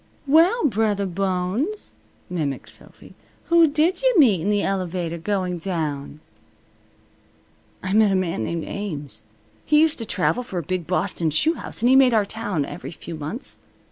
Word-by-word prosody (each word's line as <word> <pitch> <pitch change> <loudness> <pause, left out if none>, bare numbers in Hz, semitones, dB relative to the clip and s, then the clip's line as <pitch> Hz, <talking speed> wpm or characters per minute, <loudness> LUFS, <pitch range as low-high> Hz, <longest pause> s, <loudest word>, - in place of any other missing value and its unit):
"Well, 335 - +4
Brothah 210 -5 +1
Bones," 195 - -2 0.3
mimicked 150 -7 -3
Sophy, - - -12 0.4
"who 335 -1 +6
did 315 +7 +1
you - - +3
meet 225 - +5
in 195 - -1
the 205 -1 +1
elevator 180 -3 -2
going 180 -1 -2
down?" 155 -5 -4 1.6
"I 185 +1 -2
met 215 0 +5
a - - +2
man 170 -11 -1
named 170 +3 -3
Ames. 150 - -5 0.4
He 300 0 +4
used 315 -1 +3
to 230 - -4
travel 205 +6 +1
for 235 -7 -7
a 170 - -2
big 180 0 -3
Boston 180 -2 0
shoe 155 - +2
house, 290 - -8
and 240 - +5
he 260 - +6
made 260 -3 +6
our 210 -2 +3
town 200 -8 -3
every 175 - -7
few 170 - -9
months. 155 - -6
195 Hz, 165 wpm, -23 LUFS, 170-250 Hz, 1.6 s, who